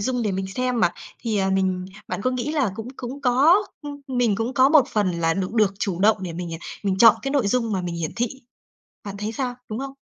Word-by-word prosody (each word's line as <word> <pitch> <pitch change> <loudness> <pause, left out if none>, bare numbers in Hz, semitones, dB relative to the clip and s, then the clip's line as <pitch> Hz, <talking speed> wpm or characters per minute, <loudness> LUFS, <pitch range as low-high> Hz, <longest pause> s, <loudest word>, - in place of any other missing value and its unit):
dung 245 +3 -1
để 210 -3 0
mình 190 0 -2
xem 250 -2 0
mà, 175 -1 +4 0.3
thì, 225 -3 -2
à, 190 0 +1
mình 190 -1 0 0.2
bạn - - -4
có 255 - +1
nghĩ 255 +4 -2
là 275 -10 +1
cũng 225 +2 -6
cũng 260 +3 -6
có 275 +7 +5 0.3
ưm, 285 -1 -7
mình 245 -5 +1
cũng 230 +4 -2
có 260 +1 +5
một 285 -4 +5
phần 210 -6 +1
là 165 0 +2
được 190 +2 -2
được 210 -4 +3
chủ 185 -3 -2
động 215 +2 +5
để 180 -2 -4
mình, 170 0 -5
à, 160 - -6 0.2
mình 195 -2 0
chọn 225 0 +8
cái 275 - -2
nội 275 -7 +1
dung 230 0 0
mà 190 - 0
mình 175 -1 -4
hiển 165 -2 -3
thị? 240 +1 +1 0.8
Bạn 200 -1 -6
thấy 210 +2 -3
sao, 250 0 -3
đúng 215 +2 -4
không? 270 0 -5
225 Hz, 255 wpm, -23 LUFS, 190-255 Hz, 0.8 s, chọn